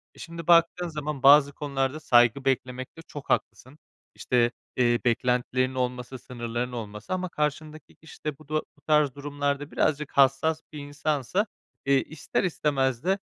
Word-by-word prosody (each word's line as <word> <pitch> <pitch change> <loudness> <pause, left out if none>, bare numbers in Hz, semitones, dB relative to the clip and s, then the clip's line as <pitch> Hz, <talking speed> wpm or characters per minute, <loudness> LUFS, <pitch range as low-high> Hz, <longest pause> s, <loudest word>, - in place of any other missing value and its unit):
E, - - -17
şimdi 170 -1 -8
baktığın 170 +1 +4
zaman 150 -3 -5
bazı 145 0 +7
konularda 140 0 -2
saygı 120 -1 +4
beklemekte 130 +3 -2
çok 145 -3 -10
haklısın. 130 +4 -2 0.4
İşte, 120 -1 +1 0.3
eee, 120 -1 +3
beklentilerin 125 +2 +1
olması, 125 0 -3
sınırlarının 120 0 -4
olması 105 - -6
ama 185 -1 -2
karşındaki 150 +1 -4
kişi 160 - -16
de 150 -3 -3
bu 155 -1 -18
da - - -6 0.2
bu 145 - -26
tarz 150 -4 +3
durumlarda 145 0 -3
birazcık 150 -1 0
hassas 140 +4 +3
bir 150 - -6
insansa, 145 - -1 0.4
eee, 140 -1 +4
ister 155 +5 -3
istemez 135 -7 0
de 190 +2 +1
140 Hz, 150 wpm, -26 LUFS, 125-155 Hz, 0.4 s, bazı